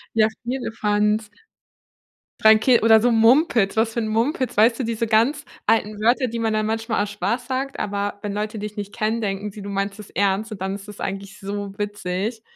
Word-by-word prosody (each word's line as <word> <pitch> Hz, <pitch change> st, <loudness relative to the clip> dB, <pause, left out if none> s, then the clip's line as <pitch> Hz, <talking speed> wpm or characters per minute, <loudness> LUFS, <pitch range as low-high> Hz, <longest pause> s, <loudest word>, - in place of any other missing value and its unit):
Ja, 215 Hz, -1 st, +5 dB, 0.2 s
Firlefanz. 215 Hz, -3 st, 0 dB, 1.1 s
Dreikä 220 Hz, +3 st, +6 dB
oder 220 Hz, 0 st, +6 dB
so 240 Hz, +2 st, +2 dB
Mumpitz, 225 Hz, -, +4 dB
was 225 Hz, 0 st, +2 dB
für -, -, -1 dB
'n 220 Hz, -, -2 dB
Mumpitz, 240 Hz, +2 st, -1 dB
weißt 230 Hz, +3 st, +4 dB
du, -, -, 0 dB
diese 230 Hz, 0 st, -1 dB
ganz 250 Hz, +6 st, +2 dB, 0.2 s
alten 215 Hz, -1 st, +1 dB
Wörter, 250 Hz, +4 st, +3 dB
die 230 Hz, 0 st, -4 dB
man 225 Hz, -1 st, 0 dB
dann 215 Hz, 0 st, 0 dB
manchmal 225 Hz, -1 st, -1 dB
aus 205 Hz, -, -5 dB
Spaß 205 Hz, +5 st, -2 dB
sagt, 270 Hz, +1 st, -3 dB
aber 205 Hz, 0 st, -2 dB
wenn 205 Hz, -, -3 dB
Leute 215 Hz, +1 st, -3 dB
dich 210 Hz, 0 st, -6 dB
nicht 205 Hz, -1 st, -6 dB
kennen, 225 Hz, +1 st, -1 dB
denken 200 Hz, 0 st, -3 dB
sie, 210 Hz, -, -10 dB
du 200 Hz, -, -7 dB
meinst 195 Hz, +1 st, -3 dB
es 210 Hz, -, -10 dB
ernst, 200 Hz, +2 st, 0 dB
und 195 Hz, -, -7 dB
dann 190 Hz, +1 st, -2 dB
ist 200 Hz, +1 st, -10 dB
es 210 Hz, -, -11 dB
eigentlich 195 Hz, 0 st, -5 dB
so 200 Hz, 0 st, -5 dB
witzig. 205 Hz, +2 st, -3 dB
215 Hz, 200 wpm, -22 LUFS, 205-230 Hz, 1.1 s, Dreikä